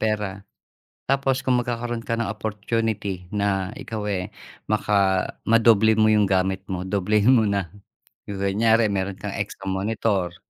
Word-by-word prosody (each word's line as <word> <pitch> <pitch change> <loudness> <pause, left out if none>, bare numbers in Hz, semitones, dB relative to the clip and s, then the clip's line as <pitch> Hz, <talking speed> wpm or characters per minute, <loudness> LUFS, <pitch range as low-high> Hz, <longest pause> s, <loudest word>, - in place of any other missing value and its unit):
pera. 105 -2 -1 0.7
Tapos 135 -1 +1
kung 130 0 +1
magkakaroon 120 -1 -2
ka 115 0 -2
ng 115 - -1
opportunity 105 -2 -2
na 100 -2 0
ikaw, 115 -5 -5
eh, 90 0 -2 0.4
maka 100 -3 +2 0.2
madoble 110 -1 +5
mo 110 0 +4
'yung 105 -2 +4
gamit 95 0 0
mo, 90 -2 -3
doblehin 105 +4 +2
mo 110 -4 +4
na. 100 -4 -1 0.6
'Yung 100 -1 -4
kunyari 110 +2 +3
meron 95 0 -2
kang 100 +1 -6
extra 100 -1 -5
monitor, 95 -3 -1
105 Hz, 145 wpm, -23 LUFS, 95-115 Hz, 0.7 s, madoble